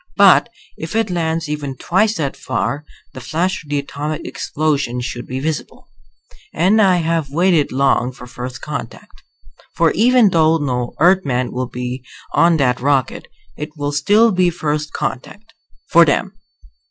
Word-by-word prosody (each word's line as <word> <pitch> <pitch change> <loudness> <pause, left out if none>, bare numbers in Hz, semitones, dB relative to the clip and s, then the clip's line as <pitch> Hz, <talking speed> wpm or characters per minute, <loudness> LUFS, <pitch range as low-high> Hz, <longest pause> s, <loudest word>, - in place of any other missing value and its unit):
But - - +6 0.3
if - - -6
it 225 -3 0
lands 165 -2 -1
even 145 -3 -4
twice 210 - +1
that 140 -7 -2
far 145 +2 -3 0.3
the - - -9
flash 180 +3 -2
of 150 - -18
the 145 - 0
atomic 145 +2 -4
explosion 140 -5 -2
should 120 0 -5
be 130 +1 -4
visible. 155 +2 -5 0.7
And 195 +7 +3
I 190 -3 +5
have 165 -3 -1
waited 170 0 +2
long 130 -2 +1
for 125 - -12
first 125 +1 -8
contact. 145 -6 -8 0.5
For 165 -1 +3
even 235 -1 +4
though 160 -1 +3
no 125 -5 -3
Earthman 150 -8 +2
will 125 0 -3
be 125 +1 -5 0.3
on 170 -1 +4
that 125 -4 +1
rocket, 135 -1 0 0.3
it 150 +1 -8
will 145 0 -2
still 205 +11 +3
be 185 -2 +2
first 150 -3 -3
contact 210 - -5 0.3
for 170 - +6
them. 165 +5 0
150 Hz, 155 wpm, -18 LUFS, 135-175 Hz, 0.7 s, But